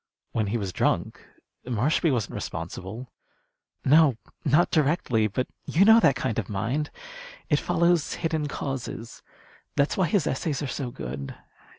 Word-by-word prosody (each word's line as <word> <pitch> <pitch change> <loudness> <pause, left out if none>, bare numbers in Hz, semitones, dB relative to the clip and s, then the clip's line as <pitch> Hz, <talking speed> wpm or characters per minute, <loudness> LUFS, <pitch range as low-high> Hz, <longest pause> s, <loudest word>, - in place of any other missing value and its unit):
"When 110 -2 0
he 110 +4 0
was 100 -4 -4
drunk. - - 0 0.4
Marshby 130 - +1
wasn't 120 -6 -1
responsible." 95 +9 -6 0.7
"No, 145 -3 +5 0.3
not 150 +5 +3
directly. 140 -8 +2
But 125 +5 -1 0.2
you 185 +5 +4
know 220 +1 +8
that 140 - +4
kind 115 - -1
of 105 - -4
mind. 115 +9 -1 0.6
It 145 - +4
follows 170 -2 +2
hidden 160 -3 -1
causes. 135 -5 -5 0.5
That's 140 +1 +1
why 185 -3 +3
his 175 -1 +1
essays 145 +2 -1
are - - -1
so 130 -1 -3
good. 70 - -6
135 Hz, 145 wpm, -26 LUFS, 110-160 Hz, 0.7 s, know